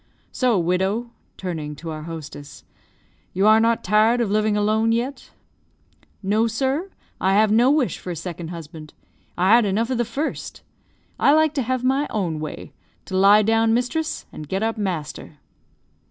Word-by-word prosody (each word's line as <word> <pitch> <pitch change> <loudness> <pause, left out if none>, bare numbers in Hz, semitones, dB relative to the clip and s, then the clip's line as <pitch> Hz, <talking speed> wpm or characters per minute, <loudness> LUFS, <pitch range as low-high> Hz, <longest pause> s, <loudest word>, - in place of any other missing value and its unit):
So, 250 -5 +1
widow 190 +7 0 0.3
(turning 160 -5 -5
to 160 +3 -7
our 155 0 -6
hostess), 155 -3 -9 0.7
you 190 +2 +1
are 215 +1 +6
not 230 0 +1
tired 215 +5 +3
of 225 -4 0
living 215 0 +1
alone 215 +2 +2
yet?" 245 +5 -2 0.9
"No, 215 +4 +2
sir; 270 - -1 0.3
I 190 +1 +2
have 210 +1 +4
no 235 +4 +4
wish 290 -3 +1
for - - -8
a 175 - -3
second 170 0 -6
husband. 160 -2 -10 0.4
I 185 +3 +3
had 235 0 +6
enough 215 +5 0
of 250 - -1
the - - +3
first. 270 +7 -5 0.6
I 280 - +5
like 315 -1 +3
to 285 - -1
have 255 +1 -2
my 270 +3 +1
own 175 -7 -2
way 155 -1 -7 0.3
to 190 - -5
lie 200 +3 +6
down 225 +1 +3
mistress, 310 +7 -2
and 150 -1 -9
get 190 +2 -1
up 225 0 0
master." 170 -7 -5
215 Hz, 170 wpm, -22 LUFS, 180-235 Hz, 0.9 s, are